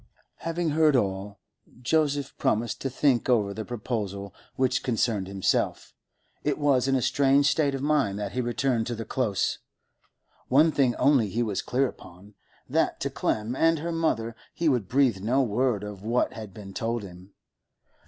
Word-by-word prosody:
Having 165 Hz, -1 st, -2 dB
heard 155 Hz, -1 st, +4 dB
all, 100 Hz, -2 st, -1 dB, 0.4 s
Joseph 145 Hz, 0 st, 0 dB
promised 115 Hz, +2 st, 0 dB
to 135 Hz, -, -1 dB
think 130 Hz, -2 st, +1 dB
over 105 Hz, -5 st, +2 dB
the 110 Hz, -, -5 dB
proposal 105 Hz, -4 st, -4 dB, 0.2 s
which 130 Hz, 0 st, +1 dB
concerned 110 Hz, -5 st, 0 dB
himself. 95 Hz, -1 st, -1 dB, 0.5 s
It 145 Hz, -1 st, 0 dB
was 140 Hz, -3 st, +2 dB
in 135 Hz, -, +2 dB
a 130 Hz, -, +1 dB
strange 140 Hz, +2 st, +3 dB
state 145 Hz, -2 st, +2 dB
of 135 Hz, -, -4 dB
mind 145 Hz, -10 st, +1 dB
that 105 Hz, -1 st, -4 dB
he 125 Hz, -, -1 dB
returned 120 Hz, -1 st, 0 dB
to 120 Hz, -, -3 dB
the 115 Hz, 0 st, -6 dB
Close; 105 Hz, -7 st, -1 dB, 0.9 s
one 150 Hz, +5 st, +5 dB
thing 130 Hz, -5 st, +2 dB
only 130 Hz, -7 st, +3 dB
he 115 Hz, +5 st, 0 dB
was 105 Hz, -4 st, -2 dB
clear 135 Hz, +2 st, +1 dB
upon, 95 Hz, -1 st, -13 dB, 0.3 s
that -, -, 0 dB
to -, -, -2 dB
Clem 110 Hz, +3 st, -1 dB
and 165 Hz, +3 st, +3 dB
her 165 Hz, +3 st, -3 dB
mother 115 Hz, -9 st, -1 dB, 0.2 s
he 170 Hz, -, 0 dB
would 125 Hz, -9 st, +1 dB
breathe 130 Hz, -5 st, +2 dB
no 125 Hz, +6 st, +2 dB
word 120 Hz, -2 st, 0 dB
of 105 Hz, -2 st, -7 dB
what 115 Hz, +4 st, 0 dB
had 110 Hz, -3 st, -8 dB
been 100 Hz, 0 st, -10 dB
told 115 Hz, +2 st, -2 dB
him. 90 Hz, +1 st, -12 dB
120 Hz, 170 wpm, -26 LUFS, 105-140 Hz, 0.9 s, one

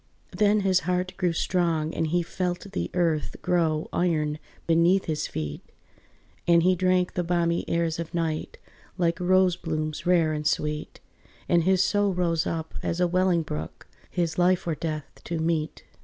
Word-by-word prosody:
Then 210 Hz, 0 st, +3 dB
his 190 Hz, -1 st, +3 dB
heart 180 Hz, 0 st, -1 dB
grew 180 Hz, -2 st, +1 dB
strong 165 Hz, -2 st, 0 dB
and 165 Hz, -, -1 dB
he 175 Hz, +2 st, +1 dB
felt 180 Hz, +2 st, -3 dB
the 200 Hz, -, -2 dB
earth 165 Hz, -4 st, 0 dB
Grow 165 Hz, -4 st, +1 dB
iron 155 Hz, -4 st, 0 dB, 0.3 s
beneath 170 Hz, +3 st, +3 dB
his 155 Hz, -2 st, -2 dB
feet, 75 Hz, -2 st, -5 dB, 0.9 s
And 170 Hz, -1 st, +5 dB
he 185 Hz, +1 st, +4 dB
drank 185 Hz, 0 st, +1 dB
the 180 Hz, -, -1 dB
balmy 170 Hz, 0 st, 0 dB
airs 165 Hz, -1 st, 0 dB
of 165 Hz, -1 st, -5 dB
night 165 Hz, -2 st, -2 dB, 0.4 s
Like 170 Hz, -1 st, +1 dB
rose 185 Hz, 0 st, +3 dB
blooms 155 Hz, -1 st, -3 dB
rare 170 Hz, -3 st, +3 dB
and 150 Hz, 0 st, -1 dB
sweet: 150 Hz, 0 st, -2 dB, 0.5 s
And 170 Hz, -1 st, +3 dB
his 190 Hz, 0 st, +4 dB
soul 205 Hz, -1 st, +1 dB
rose 170 Hz, -2 st, +1 dB
up 160 Hz, -1 st, -4 dB
as 170 Hz, -, -2 dB
a 180 Hz, -, +3 dB
welling 180 Hz, -1 st, +2 dB
brook, 80 Hz, -, -6 dB, 0.2 s
His 170 Hz, -2 st, -1 dB
life 180 Hz, +1 st, +3 dB
or 170 Hz, -, 0 dB
death 155 Hz, -2 st, -5 dB
to 170 Hz, -, -3 dB
meet. 160 Hz, -1 st, -1 dB
170 Hz, 165 wpm, -26 LUFS, 160-180 Hz, 0.9 s, And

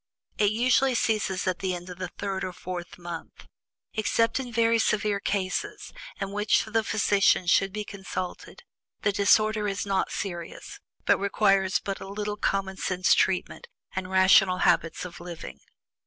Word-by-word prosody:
It 205 Hz, -1 st, +4 dB
usually 250 Hz, +4 st, +2 dB
ceases 210 Hz, -5 st, 0 dB
at 185 Hz, -1 st, -1 dB
the 185 Hz, -2 st, -1 dB
end 175 Hz, +1 st, -8 dB
of 180 Hz, 0 st, -9 dB
the 185 Hz, -, -3 dB
third 195 Hz, -2 st, -4 dB
or 185 Hz, -, -4 dB
fourth 180 Hz, 0 st, -7 dB
month. 175 Hz, -2 st, -8 dB, 0.5 s
Except 230 Hz, +3 st, +1 dB
in 250 Hz, -2 st, -5 dB
very 230 Hz, 0 st, +3 dB
severe 210 Hz, -2 st, +1 dB
cases, 190 Hz, -2 st, -3 dB, 0.3 s
in 195 Hz, 0 st, -3 dB
which 205 Hz, +1 st, +2 dB
the 220 Hz, 0 st, 0 dB
physician 200 Hz, -3 st, +2 dB
should 195 Hz, +2 st, +3 dB
be 210 Hz, +2 st, -4 dB
consulted, 185 Hz, -3 st, -7 dB, 0.4 s
the 205 Hz, -, +3 dB
disorder 215 Hz, +1 st, +3 dB
is 195 Hz, -1 st, -2 dB
not 195 Hz, -1 st, 0 dB
serious, 175 Hz, -4 st, -6 dB, 0.3 s
and -, -, +4 dB
requires 195 Hz, -2 st, +2 dB
but 195 Hz, -1 st, -4 dB
a -, -, -7 dB
little 205 Hz, +1 st, -3 dB
common 195 Hz, -1 st, -1 dB
sense 185 Hz, -1 st, +2 dB
treatment, 185 Hz, -1 st, 0 dB, 0.3 s
and 185 Hz, -1 st, -3 dB
rational 190 Hz, 0 st, +5 dB
habits 170 Hz, -1 st, +2 dB
of 175 Hz, -1 st, -9 dB
living. 170 Hz, -, -8 dB
195 Hz, 155 wpm, -27 LUFS, 185-210 Hz, 0.5 s, rational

